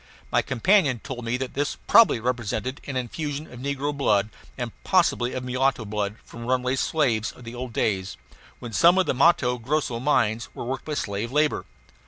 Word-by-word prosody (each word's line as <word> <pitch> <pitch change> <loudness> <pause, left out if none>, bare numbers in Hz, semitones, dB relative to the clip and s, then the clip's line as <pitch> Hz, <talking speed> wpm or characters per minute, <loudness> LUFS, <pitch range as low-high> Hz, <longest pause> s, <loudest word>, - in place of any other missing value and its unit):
My - - +3
companion 160 - +2
told 125 -1 -7
me 120 +2 0
that 130 0 -4
this 145 +1 -1
probably 225 - +6
represented 120 +1 -2
an 135 - -4
infusion 145 +4 -4
of 120 - -9
negro 140 +2 -2
blood, 110 -6 +2 0.3
and 120 -3 -3
possibly 170 -9 +2
of 130 - -4
mulatto 130 -1 0
blood, 105 0 -2
from 115 0 -9
runaway 130 0 +1
slaves 130 -6 +1
of 125 - -15
the 115 0 -8
old 125 0 -6
days, 95 -3 -1 0.4
when 120 -2 -8
some 170 - +5
of 190 - +4
the - - +1
Matto 130 -3 +3
Grosso 125 -1 -1
mines 115 -4 +1
were - - -5
worked 130 +2 -4
by 150 - -3
slave 105 0 -3
labor. 150 +1 +1
125 Hz, 185 wpm, -25 LUFS, 115-145 Hz, 0.4 s, probably